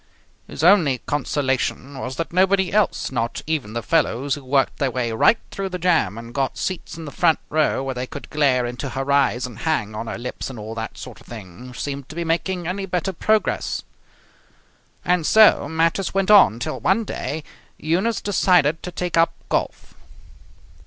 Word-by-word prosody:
His 145 Hz, -, -6 dB
only 170 Hz, -8 st, +5 dB
consolation 135 Hz, -1 st, -1 dB
was 130 Hz, 0 st, -5 dB
that 165 Hz, +4 st, -4 dB
nobody 190 Hz, 0 st, +2 dB
else, 210 Hz, -8 st, +1 dB
not 115 Hz, -2 st, -2 dB
even 150 Hz, -9 st, -2 dB
the 115 Hz, -1 st, -3 dB
fellows 140 Hz, -4 st, +1 dB
who 145 Hz, -, -5 dB
worked 135 Hz, +1 st, +1 dB
their 140 Hz, -, +1 dB
way 120 Hz, -2 st, -2 dB
right 115 Hz, -, +4 dB
through 195 Hz, -1 st, -4 dB
the 180 Hz, -, -4 dB
jam 165 Hz, -, +1 dB
and 115 Hz, +1 st, -9 dB
got 135 Hz, 0 st, -1 dB
seats 185 Hz, -2 st, -4 dB
in 165 Hz, -, -7 dB
the 145 Hz, -, -7 dB
front 165 Hz, 0 st, +3 dB
row 155 Hz, -3 st, +1 dB
where 135 Hz, -1 st, -3 dB
they 125 Hz, 0 st, -4 dB
could 145 Hz, -, -8 dB
glare 135 Hz, -5 st, +2 dB
into 120 Hz, +3 st, -5 dB
her 135 Hz, +2 st, -3 dB
eyes 135 Hz, -3 st, +2 dB
and 120 Hz, -3 st, -9 dB
hang 120 Hz, -10 st, -1 dB
on 110 Hz, +2 st, -5 dB
her -, -, -4 dB
lips 125 Hz, +3 st, -5 dB
and 130 Hz, -, -8 dB
all 110 Hz, +1 st, -6 dB
that 115 Hz, -1 st, -6 dB
sort -, -, -10 dB
of -, -, -20 dB
thing, 110 Hz, +2 st, -10 dB
seemed 140 Hz, -1 st, -5 dB
to 155 Hz, -, -9 dB
be 170 Hz, -, -2 dB
making 175 Hz, +2 st, -1 dB
any 195 Hz, +3 st, -3 dB
better 180 Hz, +1 st, -2 dB
progress. 215 Hz, +5 st, 0 dB, 1.2 s
And 180 Hz, -1 st, +2 dB
so 215 Hz, -5 st, +5 dB
matters 165 Hz, +4 st, 0 dB
went 195 Hz, +1 st, +2 dB
on 200 Hz, -, +7 dB
till 120 Hz, -, -4 dB
one 195 Hz, +5 st, +2 dB
day 155 Hz, -6 st, -4 dB, 0.3 s
Eunice 185 Hz, +9 st, 0 dB
decided 180 Hz, -6 st, +2 dB
to 180 Hz, -, -6 dB
take 175 Hz, 0 st, -3 dB
up 165 Hz, 0 st, +4 dB, 0.2 s
golf. -, -, -2 dB
145 Hz, 185 wpm, -22 LUFS, 125-180 Hz, 1.2 s, on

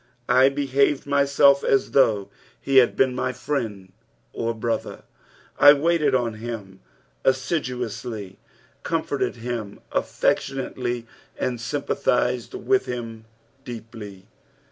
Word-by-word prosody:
/ 120 Hz, -1 st, -41 dB
hehatxd 135 Hz, +1 st, +3 dB
myietf 140 Hz, 0 st, +4 dB
a» -, -, +4 dB
though 110 Hz, -7 st, +3 dB, 0.3 s
he 135 Hz, -1 st, +1 dB
hiid 125 Hz, -2 st, +6 dB
ieen 130 Hz, -1 st, +3 dB
my 130 Hz, 0 st, -1 dB
friend 110 Hz, -10 st, -4 dB, 0.4 s
or 115 Hz, 0 st, -2 dB
brother 115 Hz, +1 st, -3 dB, 0.3 s
:" -, -, -29 dB
I 145 Hz, 0 st, +10 dB
waited 150 Hz, -2 st, +2 dB
on 120 Hz, -3 st, 0 dB
him 105 Hz, -5 st, -7 dB, 0.4 s
assiduously, 125 Hz, -, -2 dB, 0.4 s
comforted 160 Hz, -5 st, -1 dB
him 115 Hz, -3 st, -5 dB
affectionately, 125 Hz, -3 st, -1 dB, 0.3 s
and 120 Hz, -2 st, -2 dB
sympathised 125 Hz, -1 st, -1 dB
with 395 Hz, 0 st, +1 dB
him 115 Hz, -2 st, -6 dB, 0.4 s
deeply. 110 Hz, -5 st, -9 dB
125 Hz, 105 wpm, -24 LUFS, 115-140 Hz, 0.4 s, I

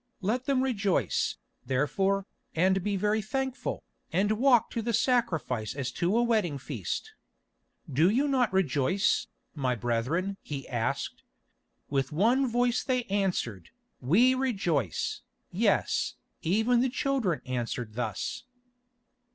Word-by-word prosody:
Let 235 Hz, +7 st, 0 dB
them 265 Hz, -2 st, +2 dB
rejoice, 200 Hz, -, 0 dB, 0.3 s
therefore, 190 Hz, +9 st, +1 dB, 0.3 s
and 190 Hz, +3 st, +3 dB
be 205 Hz, -1 st, 0 dB
very 210 Hz, +3 st, +1 dB
thankful, 265 Hz, +4 st, -3 dB, 0.3 s
and 195 Hz, +5 st, +2 dB
walk 240 Hz, +2 st, +4 dB
to 230 Hz, -, -2 dB
the 235 Hz, +1 st, -2 dB
sacrifice 155 Hz, -, 0 dB
as 130 Hz, -3 st, -3 dB
to 175 Hz, -, +1 dB
a 240 Hz, -, +4 dB
wedding 215 Hz, -11 st, +1 dB
feast. 440 Hz, -, -5 dB, 0.7 s
"Do 155 Hz, +5 st, +3 dB
you 265 Hz, +8 st, +2 dB
not 255 Hz, -5 st, +2 dB
rejoice, 185 Hz, +1 st, +2 dB, 0.3 s
my 130 Hz, -4 st, 0 dB
brethren?" 125 Hz, -, -1 dB
he 140 Hz, -2 st, -6 dB
asked. 120 Hz, -3 st, -2 dB, 0.7 s
With 135 Hz, -2 st, 0 dB
one 235 Hz, -, +3 dB
voice 245 Hz, 0 st, +1 dB
they 250 Hz, -2 st, 0 dB
answered, 180 Hz, -, -1 dB, 0.3 s
"We 220 Hz, -, +4 dB
rejoice!" 190 Hz, -, -1 dB, 0.3 s
Yes, -, -, +1 dB, 0.3 s
even 220 Hz, +8 st, +2 dB
the 260 Hz, -, +2 dB
children 245 Hz, -, 0 dB
answered 120 Hz, -3 st, -3 dB
thus. 110 Hz, -, -3 dB
195 Hz, 120 wpm, -29 LUFS, -, 0.7 s, walk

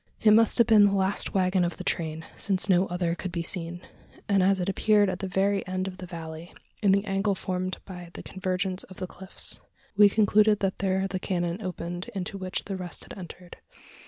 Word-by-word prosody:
It 215 Hz, -, +5 dB
must 225 Hz, +1 st, +5 dB
have 235 Hz, -, +6 dB
been 215 Hz, -2 st, +6 dB
the 200 Hz, 0 st, +2 dB
last 190 Hz, +1 st, 0 dB
waggon 185 Hz, -1 st, +2 dB
of 175 Hz, -1 st, -2 dB
the -, -, -6 dB
train: 160 Hz, -1 st, -2 dB
since 195 Hz, -1 st, 0 dB
no 185 Hz, -1 st, +4 dB
other 175 Hz, -1 st, -1 dB
could 180 Hz, +1 st, -5 dB
be 170 Hz, -1 st, -2 dB
seen; 175 Hz, 0 st, -3 dB, 0.5 s
and 200 Hz, -1 st, +3 dB
as 190 Hz, +1 st, +3 dB
it 180 Hz, -, -2 dB
appeared 205 Hz, 0 st, +3 dB
at 180 Hz, -, -5 dB
the 195 Hz, -, -3 dB
very 195 Hz, +2 st, +1 dB
end 185 Hz, +1 st, -2 dB
of 185 Hz, -1 st, -7 dB
the 185 Hz, -1 st, -8 dB
valley 165 Hz, 0 st, -8 dB, 0.3 s
in 200 Hz, -3 st, +4 dB
the 200 Hz, +1 st, +2 dB
angle 195 Hz, 0 st, 0 dB
formed 185 Hz, 0 st, -3 dB
by 180 Hz, -2 st, -9 dB
the -, -, -8 dB
convergence 185 Hz, 0 st, -2 dB
of 185 Hz, -, -14 dB
the 185 Hz, -, -3 dB
cliffs 190 Hz, +1 st, 0 dB, 0.4 s
we 205 Hz, 0 st, +7 dB
concluded 210 Hz, 0 st, +4 dB
that 195 Hz, -1 st, -1 dB
there 190 Hz, 0 st, +1 dB
the 190 Hz, -1 st, -3 dB
canon 175 Hz, +1 st, -2 dB
opened 175 Hz, +1 st, -5 dB
into 195 Hz, +1 st, -4 dB
which 185 Hz, -1 st, -3 dB
the 195 Hz, -1 st, -4 dB
rest 180 Hz, -2 st, -4 dB
had -, -, -10 dB
entered. 180 Hz, -1 st, -10 dB
185 Hz, 215 wpm, -27 LUFS, 180-195 Hz, 0.5 s, we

